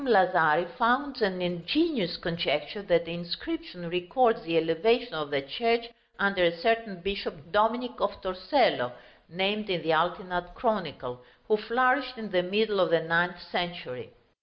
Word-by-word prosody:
Lazari 180 Hz, -6 st, +4 dB
founds 250 Hz, +2 st, +1 dB
an 190 Hz, -3 st, 0 dB
ingenious 180 Hz, -, 0 dB
conjecture 170 Hz, +1 st, -2 dB
that 170 Hz, -4 st, +2 dB
the 165 Hz, -, -6 dB
inscription 175 Hz, -, -6 dB
records 225 Hz, +7 st, +2 dB
the 165 Hz, -5 st, -1 dB
elevation 225 Hz, +10 st, +2 dB
of 150 Hz, -2 st, -4 dB
the 140 Hz, -1 st, -1 dB
church 235 Hz, +10 st, 0 dB, 0.3 s
under 200 Hz, -1 st, +1 dB
a 170 Hz, 0 st, +3 dB
certain 225 Hz, 0 st, 0 dB
bishop 195 Hz, -4 st, -5 dB
Dominic 225 Hz, +4 st, +2 dB
of 200 Hz, 0 st, -1 dB
Torcello 185 Hz, -, +1 dB, 0.4 s
(named 195 Hz, +5 st, -1 dB
in 175 Hz, -4 st, -1 dB
the 160 Hz, 0 st, +2 dB
Altinat 175 Hz, +2 st, -1 dB
Chronicle), 150 Hz, -, -2 dB, 0.3 s
who 215 Hz, -, +4 dB
flourished 255 Hz, +4 st, +1 dB
in 215 Hz, -2 st, -7 dB
the 180 Hz, -1 st, +3 dB
middle 205 Hz, +3 st, 0 dB
of 180 Hz, -2 st, +3 dB
the 165 Hz, -1 st, +3 dB
ninth 175 Hz, +1 st, +1 dB
century. 175 Hz, -8 st, -4 dB
185 Hz, 145 wpm, -28 LUFS, 170-225 Hz, 0.4 s, Lazari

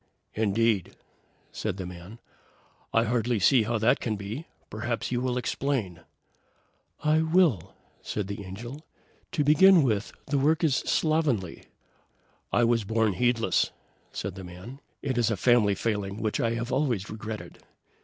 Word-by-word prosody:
"Indeed!" 110 Hz, -2 st, +1 dB, 0.6 s
said -, -, -3 dB
the 95 Hz, -, -5 dB
man. 90 Hz, +5 st, -10 dB, 0.7 s
"I 115 Hz, -, +3 dB
hardly 120 Hz, 0 st, 0 dB
see 120 Hz, +5 st, +5 dB
how 115 Hz, +2 st, 0 dB
that 110 Hz, +3 st, +3 dB
can 110 Hz, -3 st, -2 dB
be. 105 Hz, +10 st, -6 dB, 0.2 s
Perhaps 115 Hz, +3 st, -3 dB
you 120 Hz, -1 st, 0 dB
will 125 Hz, -1 st, -1 dB
explain." 120 Hz, -7 st, -2 dB, 1.0 s
"I 155 Hz, +1 st, +3 dB
will!" 160 Hz, -, +2 dB, 0.3 s
said 105 Hz, -, -3 dB
the 100 Hz, +1 st, -6 dB
Angel. 120 Hz, +10 st, -8 dB, 0.5 s
"To 150 Hz, -, +1 dB
begin 165 Hz, +4 st, +6 dB
with, 110 Hz, -5 st, 0 dB
the 140 Hz, -1 st, 0 dB
work 155 Hz, +5 st, +2 dB
is 145 Hz, -5 st, +3 dB
slovenly." 150 Hz, -, 0 dB, 0.9 s
"I 120 Hz, -, +3 dB
was 115 Hz, -1 st, +2 dB
born 110 Hz, 0 st, +1 dB
heedless," 120 Hz, +3 st, +1 dB, 0.4 s
said 100 Hz, -, -4 dB
the 95 Hz, 0 st, -9 dB
man. 90 Hz, +10 st, -10 dB, 0.2 s
"It 130 Hz, -4 st, -1 dB
is 115 Hz, -, +2 dB
a 110 Hz, -, -1 dB
family 110 Hz, -2 st, +4 dB
failing 105 Hz, -2 st, -2 dB
which 110 Hz, -1 st, -1 dB
I 115 Hz, 0 st, +1 dB
have 120 Hz, +2 st, -4 dB
always 125 Hz, -8 st, 0 dB
regretted." 110 Hz, 0 st, -7 dB
115 Hz, 145 wpm, -27 LUFS, 105-130 Hz, 1.0 s, begin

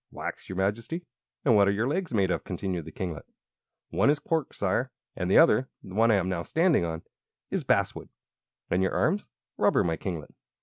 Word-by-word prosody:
"Wax, -, -, -6 dB
your 95 Hz, -, -5 dB
Majesty." 115 Hz, -, -2 dB, 0.4 s
"And 120 Hz, -6 st, +5 dB
what 100 Hz, -1 st, +5 dB
are -, -, +4 dB
your 110 Hz, +4 st, 0 dB
legs 175 Hz, +5 st, -1 dB
made 100 Hz, -5 st, +2 dB
of?" -, -, -1 dB
continued 90 Hz, -3 st, -3 dB
the 80 Hz, -, -9 dB
kinglet. 85 Hz, -3 st, -5 dB, 0.6 s
"One -, -, +3 dB
is 150 Hz, -, +4 dB
cork, 160 Hz, -1 st, -1 dB
Sire, 100 Hz, +6 st, 0 dB, 0.3 s
and 90 Hz, -1 st, -2 dB
the -, -, +5 dB
other 125 Hz, +5 st, +5 dB
the 95 Hz, -, -10 dB
one 115 Hz, +3 st, +4 dB
I 110 Hz, -, +5 dB
am 95 Hz, -2 st, +1 dB
now 90 Hz, -2 st, -1 dB
standing 165 Hz, -, +2 dB
on 80 Hz, -1 st, -3 dB, 0.5 s
is -, -, -1 dB
basswood." -, -, 0 dB, 0.6 s
"And 90 Hz, -, +2 dB
your 95 Hz, -, +1 dB
arms?" 205 Hz, -, +1 dB, 0.3 s
"Rubber, -, -, +3 dB
my 80 Hz, -2 st, 0 dB
kinglet." 85 Hz, -6 st, -5 dB
100 Hz, 200 wpm, -28 LUFS, 90-130 Hz, 0.6 s, And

